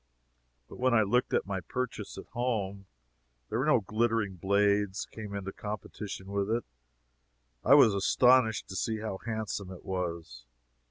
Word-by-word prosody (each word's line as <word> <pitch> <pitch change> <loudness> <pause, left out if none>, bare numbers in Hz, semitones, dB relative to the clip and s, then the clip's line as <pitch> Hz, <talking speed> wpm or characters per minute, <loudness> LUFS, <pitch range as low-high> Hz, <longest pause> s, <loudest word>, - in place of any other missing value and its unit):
But - - -12
when 130 -1 +3
I 110 - +5
looked 125 +5 +1
at - - +1
my 95 -1 -2
purchase, 115 +1 -4
at - - -8
home, 105 -5 -2 0.6
where 115 +4 0
no 150 -6 +4
glittering 110 -1 0
blades 100 +2 +1
came 105 -2 -8
into 95 -1 -5
competition 105 -2 -6
with 100 0 -1
it, 115 +2 0 1.0
I 135 - +7
was 120 -7 +7
astonished 115 +3 +4
to 95 - -6
see 110 +4 -1
how 105 -3 -4
handsome 110 -4 -3
it 90 - -11
was. 85 -10 -4
105 Hz, 150 wpm, -30 LUFS, 95-115 Hz, 1.0 s, I